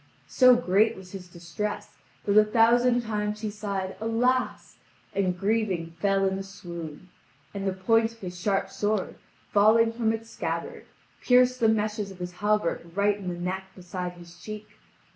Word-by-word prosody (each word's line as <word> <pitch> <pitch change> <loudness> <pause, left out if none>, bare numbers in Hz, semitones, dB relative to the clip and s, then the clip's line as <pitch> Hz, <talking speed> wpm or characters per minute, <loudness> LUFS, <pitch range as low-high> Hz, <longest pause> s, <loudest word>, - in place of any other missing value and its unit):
So 255 -1 +6
great 220 0 +2
was 185 -1 -12
his 190 -2 -8
distress 175 +5 -5 0.4
that 200 - +1
a 215 - +8
thousand 235 +3 +4
times 210 -2 -3
he 215 -2 -2
sighed 200 -2 -4
"alas!" 245 +3 0 0.4
and 185 -2 0
grieving 195 -5 0
fell 195 +1 +2
in 190 0 -1
a - - -3
swoon; 175 -4 -9 0.4
and 200 -1 -3
the 190 - 0
point 225 +4 +2
of - - -20
his 180 -4 -7
sharp 195 0 0
sword, 210 -2 -1 0.4
falling 225 +1 +5
from 230 -1 +1
its 225 0 -5
scabbard, 165 0 -4 0.3
pierced 250 0 +4
the 225 - +4
meshes 215 -1 0
of 190 - -11
his 180 0 -5
hauberk 210 -1 0
right 205 0 +2
in 190 - -7
the 175 -1 -4
neck 185 +2 -3
beside 180 -1 -6
the 175 - -11
cheek. 210 +5 -9
205 Hz, 165 wpm, -27 LUFS, 185-225 Hz, 0.4 s, a